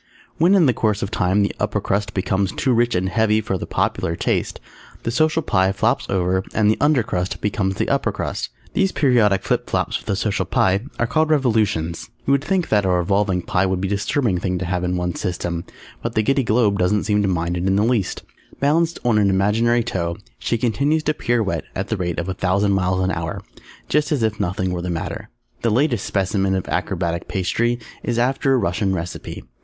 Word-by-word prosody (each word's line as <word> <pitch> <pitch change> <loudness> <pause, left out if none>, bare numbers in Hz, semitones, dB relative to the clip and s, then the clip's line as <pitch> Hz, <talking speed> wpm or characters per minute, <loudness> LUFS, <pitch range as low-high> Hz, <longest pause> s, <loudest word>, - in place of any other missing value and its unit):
_ - - -38 0.4
When 175 +5 +5
in 180 -5 +5
the 130 - +4
course 105 -4 0
of 100 - -4
time 95 +1 +2
the 100 - -1
Upper 105 0 0
Crust 100 0 -2
becomes 95 0 0
too 130 - 0
rich 120 -1 +2
and 90 +1 +1
heavy 110 +3 +2
for 95 -3 -2
the - - -5
popular 85 - -1
taste, - - -1 0.4
the 115 - -1
Social 155 +4 +2
Pie 95 -5 +2
flops 110 +6 0
over 95 0 +1
and 105 -1 +4
the - - 0
Under 145 -5 +4
Crust 95 -5 -3
becomes 95 -2 -1
the - - -1
Upper - - +1
Crust. - - -4 0.2
These 195 -1 +1
periodic 115 -9 +3
flip - - -1
flops - - 0
of - - -17
the 100 - 0
Social 100 +1 -1
Pie 95 +5 +1
are 120 - +1
called 155 +6 +1
Revolutions. 110 - +1 0.2
You - - +1
would 140 0 +3
think 190 -1 0
that 105 -2 +3
a 95 - 0
Revolving 90 +1 +1
Pie 95 +1 +1
would 95 -1 -1
be 95 - -1
a - - 0
disturbing 105 - 0
thing 90 0 -1
to 95 - -3
have 90 +1 -1
in 90 0 0
one's 90 -1 -2
system, 85 -1 -3 0.4
but 115 0 -4
the 110 - +3
Giddy 135 +4 +2
Globe 110 -3 +2
doesn't 90 +3 +2
seem 105 -1 +1
to 100 - +1
mind 85 -1 -1
it 90 +2 -1
in 95 - +2
the 100 - +3
least. 115 -4 0 0.4
Balanced 160 +4 +2
on 115 -3 +3
an 100 -1 +3
imaginary 110 +5 +2
toe, 85 -7 -2 0.2
she 115 - 0
continues 140 +7 +1
to 155 - +1
pirouette 115 - -1
at 95 - -3
the 110 - -1
rate 90 -2 -2
of 85 - -2
a 95 - -1
thousand 95 +2 +1
miles 95 -1 +1
an 95 - +1
hour, 85 -2 -3 0.5
just 150 +1 +1
as 140 -6 +1
if 110 0 0
nothing 95 +1 -1
were 90 - -3
the 90 - -4
matter. 85 -2 -4 0.3
The 115 - +1
latest 120 -1 +1
specimen 95 0 0
of 95 - -3
Acrobatic 85 +1 -2
Pastry 120 +6 0 0.2
is 120 -1 -2
after 135 +2 +2
a - - +3
Russian 95 -2 0
recipe. 85 0 -6
100 Hz, 220 wpm, -21 LUFS, 95-120 Hz, 0.5 s, When